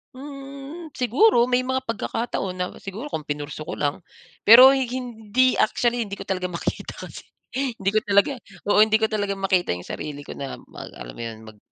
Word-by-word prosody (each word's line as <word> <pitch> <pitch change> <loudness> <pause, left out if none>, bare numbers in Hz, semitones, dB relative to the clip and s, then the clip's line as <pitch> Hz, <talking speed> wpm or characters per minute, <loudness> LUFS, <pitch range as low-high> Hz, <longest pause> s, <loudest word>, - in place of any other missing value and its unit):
Mm, 275 +4 -9
siguro 250 - +4
may 250 +1 +3
mga 260 0 0
pagkakataon 230 -4 -3
na 180 0 -1
siguro 215 +10 -7
kung 155 - -4
pinurso 145 +1 -5
ko - - -4
lang. 145 -1 -1 0.5
Pero 250 +5 +11
hindi 250 -2 0
actually, 240 0 +2
hindi 200 - -5
ko - - -8
talaga 185 -1 -2
makita 170 -1 -4
kasi. - - -10 0.3
Hindi 245 -7 -1
ko - - +6
talaga 200 +4 +3 0.4
oo, - - +5
hindi 220 0 +2
ko 220 - +2
talaga 205 -2 0
makita 190 -2 +1
yung 90 - -9
sarili 150 -1 -5
ko - - -9
na 135 -1 -5
mag - - -10
alam - - -9
mo - - -8
'yon, 115 -1 -6
mag 110 -1 -13
220 Hz, 185 wpm, -24 LUFS, 180-260 Hz, 0.5 s, Pero